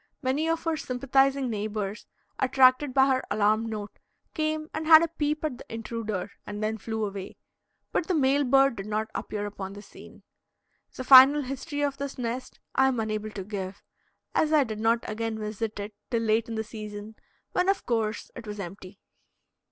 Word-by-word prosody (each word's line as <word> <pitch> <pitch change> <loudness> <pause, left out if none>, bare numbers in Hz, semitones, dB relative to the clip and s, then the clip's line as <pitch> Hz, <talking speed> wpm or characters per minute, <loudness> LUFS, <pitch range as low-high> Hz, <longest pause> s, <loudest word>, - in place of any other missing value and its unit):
Many 285 +5 0
of 330 0 -1
her 325 -1 0
sympathizing 270 0 +1
neighbors, 210 -1 -4 0.3
attracted 260 +1 +4
by 265 +1 +5
her 260 -1 +1
alarm 215 +2 +2
note, 210 -2 -6 0.3
came 310 -1 -1
and 315 0 -4
had 320 0 +9
a - - +1
peep 305 -1 -2
at 275 -6 -3
the - - -10
intruder 220 -4 -4
and 205 +1 -6
then 220 +1 -1
flew 220 +1 -2
away, 195 -2 -7 0.5
but 340 - -1
the 370 - +1
male 280 -1 +3
bird 270 -1 +4
did 195 +1 -6
not 215 +1 -2
appear 205 -1 -4
upon 195 -1 -6
the 205 - -9
scene. - - -15 0.7
The 255 - -5
final 270 +3 +9
history 275 +3 -4
of 280 -1 -1
this 280 0 -5
nest 245 +1 -4
I 265 +1 +4
am 255 -3 0
unable 215 -1 -2
to 205 -2 -6
give, 195 -1 -6 0.5
as 310 - +2
I 305 -2 +5
did 215 -4 -5
not 230 +1 +1
again 225 +1 -3
visit 215 0 -4
it 205 +1 -6 0.2
till 230 -2 0
late 225 +1 +1
in 225 - -4
the 220 - -1
season, 215 -1 -8 0.4
when, 360 +1 +1
of 395 - 0
course, 225 -2 -1
it 235 -2 -9
was 210 0 -6
empty. 190 +1 -8
230 Hz, 185 wpm, -27 LUFS, 215-275 Hz, 0.7 s, had